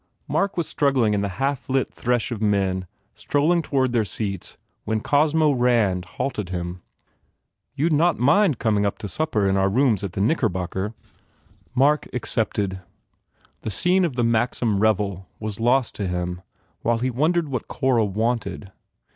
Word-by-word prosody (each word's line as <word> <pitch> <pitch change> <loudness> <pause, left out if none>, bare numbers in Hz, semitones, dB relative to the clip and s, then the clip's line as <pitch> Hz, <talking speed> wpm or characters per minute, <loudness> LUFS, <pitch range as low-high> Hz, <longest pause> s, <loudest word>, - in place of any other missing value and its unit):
Mark 195 -1 0
was 170 - 0
struggling 130 -7 +2
in 100 - +1
the 100 - -1
half 135 0 -2
lit 135 0 0
thresh 120 0 -1
of 115 -3 -4
men 95 -3 +1 0.3
strol 145 +2 0
ling 175 -1 +3
toward 130 -5 0
their 120 -2 +2
seats 100 -2 -5 0.3
when 110 0 -1
Cosmo 150 +4 +3
Rand 115 -8 +2
halted 105 -9 -2
him. 90 0 -4 0.9
"You 150 +4 +1
d 155 - +2
not 170 +2 +3
mind 150 - +3
coming 105 -3 +1
to 105 - -8
supper 110 -5 0
in 95 0 +2
our 95 0 +3
rooms 115 -2 +2
at 95 -3 -4
the - - -4
Knickbocker?" 100 - -1 0.8
Mark 145 +4 +3
accepted. 100 -5 -1 0.8
The - - -4
scene 180 - +2
of 160 -8 -1
the 120 - +1
Maxim 115 -2 +1
revel 100 -3 0
was 110 -1 -4
lost 120 +2 +2
to 100 - -2
him 90 0 -3 0.4
while 115 0 +1
he 125 +2 -1
wondered 155 +5 +1
what 125 -3 -3
Cora 130 -4 +1
wanted. 110 0 -2
115 Hz, 160 wpm, -23 LUFS, 100-140 Hz, 0.9 s, ling